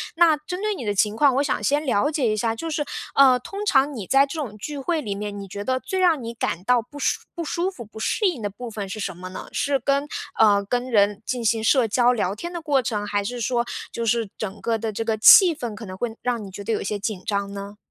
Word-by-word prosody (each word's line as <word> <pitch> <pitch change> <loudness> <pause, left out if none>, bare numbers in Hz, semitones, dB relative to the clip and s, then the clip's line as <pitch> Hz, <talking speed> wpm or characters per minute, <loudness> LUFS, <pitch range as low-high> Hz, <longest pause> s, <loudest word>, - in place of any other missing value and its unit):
那 330 -3 +5
针 360 +6 -6
对 425 0 0
你 255 - -6
的 205 -1 -1
情 210 +2 +1
况， 280 -3 +4
我 280 - +2
想 280 - -1
先 295 +2 +1
了 260 +3 +2
解 275 -7 0
一 215 - -1
下， 225 +1 0
就 325 +8 -5
是， 300 -1 -1 0.3
呃， 265 -2 +7
通 400 +10 -6
常 280 -4 +3
你 210 -7 -6
在 275 +1 +5
这 310 +3 -6
种 215 -7 -5
聚 290 +6 -6
会 320 +3 -1
里 205 -6 -3
面， 205 0 -5
你 195 -1 -8
觉 200 +1 -6
得 260 0 +1
最 380 - -3
让 330 -8 +3
你 230 +1 -5
感 195 -6 -2
到 245 +2 +3
不 290 +5 -12
舒 - - +1
不 340 - -4
舒 345 +4 -1
服、 245 -10 -9
不 220 +1 -12
适 415 - 0
应 325 -9 -1
的 205 - -2
部 240 +4 -8
分 205 -2 -5
是 200 +3 -6
什 185 -3 -4
么 185 0 -8
呢？ - - -8
是 280 -2 0
跟 280 +3 0 0.3
呃， 205 -2 +5
跟 245 +4 -1
人 205 -1 +3
进 245 -2 -2
行 220 0 +1
社 240 0 +4
交 245 +3 +3
聊 200 -3 -1
天 345 +10 -6
的 345 - -4
过 285 -4 +2
程， 210 -3 -2
还 205 -1 0
是 245 +3 -4
说， 240 +1 0 0.3
就 230 0 -3
是 230 -2 +1
整 205 -1 -5
个 230 -1 0
的 220 0 -3
这 225 - -3
个 225 -1 -1
气 340 - +8
氛， 240 -7 -5
可 220 +1 -8
能 185 - -8
会 230 +1 -3
让 240 -3 -1
你 190 - -10
觉 200 +2 -8
得 225 - -2
有 215 - -1
些 205 +1 -3
紧 200 -2 -4
张 200 -1 -1
呢？ 200 +1 -7
235 Hz, 295 characters per minute, -23 LUFS, 205-285 Hz, 0.3 s, 气